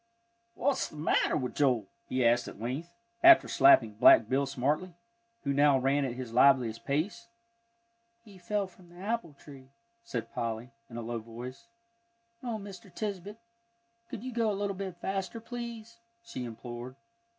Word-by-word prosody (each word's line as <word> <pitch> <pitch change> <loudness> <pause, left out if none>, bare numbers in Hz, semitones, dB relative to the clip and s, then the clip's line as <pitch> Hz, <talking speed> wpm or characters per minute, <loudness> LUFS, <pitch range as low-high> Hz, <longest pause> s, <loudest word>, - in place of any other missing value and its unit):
"What's 270 0 0
th' - - -18
matter 155 +1 +1
with 130 -4 -3
Joel?" 125 -7 +2 0.2
he 130 -1 0
asked 120 +1 +3
at - - -9
length, 135 +9 -4 0.3
after 340 -1 +8
slapping 340 -1 +5
Black 330 0 +7
Bill 135 +1 +1
smartly, 150 +7 -1 0.5
who 140 -2 0
now 145 0 +5
ran 135 +2 +1
at 125 -2 -4
his 125 -3 -7
liveliest 125 -3 +4
pace. 170 +11 -2 1.0
"He 200 -3 -15
fell 205 +3 -1
from 180 -1 -18
the 175 - -16
apple 200 -4 -3
tree," 135 -2 -14 0.3
said 115 - -5
Polly, 115 +1 -3 0.2
in 115 - -8
a 120 - -4
low 115 +1 -3
voice. 120 - -9 0.7
"Oh, 235 -3 -3
Mr. 200 -1 -10
Tisbett, 205 +1 -5 0.7
could 215 - -7
you 255 -1 -5
go 230 -1 +1
a 200 - -3
little 200 -1 -2
bit 190 -2 -6
faster, 195 +5 -3
please?" 230 -1 -8 0.2
she 180 - -6
implored. 120 +2 -8
155 Hz, 160 wpm, -30 LUFS, 125-210 Hz, 1.0 s, after